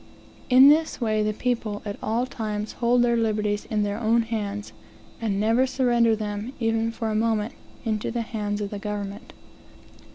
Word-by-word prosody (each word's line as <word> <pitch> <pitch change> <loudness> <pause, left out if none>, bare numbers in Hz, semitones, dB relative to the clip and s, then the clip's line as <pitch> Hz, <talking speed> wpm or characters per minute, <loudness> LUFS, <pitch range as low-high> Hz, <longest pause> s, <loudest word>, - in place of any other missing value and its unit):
In 260 +2 +8
this 315 +2 +3
way, 215 -3 +1
the 215 0 +1
people, 220 -2 -2
at 205 -1 -4
all 230 +3 0
times, 215 -4 -4
hold 245 0 +2
their 235 -1 +3
liberties 210 -2 0
in 210 -1 0
their 205 +1 -2
own 230 +1 +3
hands, 210 -2 -4 0.5
and 205 -3 0
never 225 +5 +3
surrender 240 -3 +3
them, 210 +3 -4
even 225 -1 +1
for 225 -1 -3
a - - -1
moment, 220 0 0 0.3
into 215 -2 -1
the 235 0 -2
hands 210 -2 -3
of 200 - -3
the 205 - -5
government. 205 0 -5
220 Hz, 170 wpm, -25 LUFS, 210-235 Hz, 0.5 s, In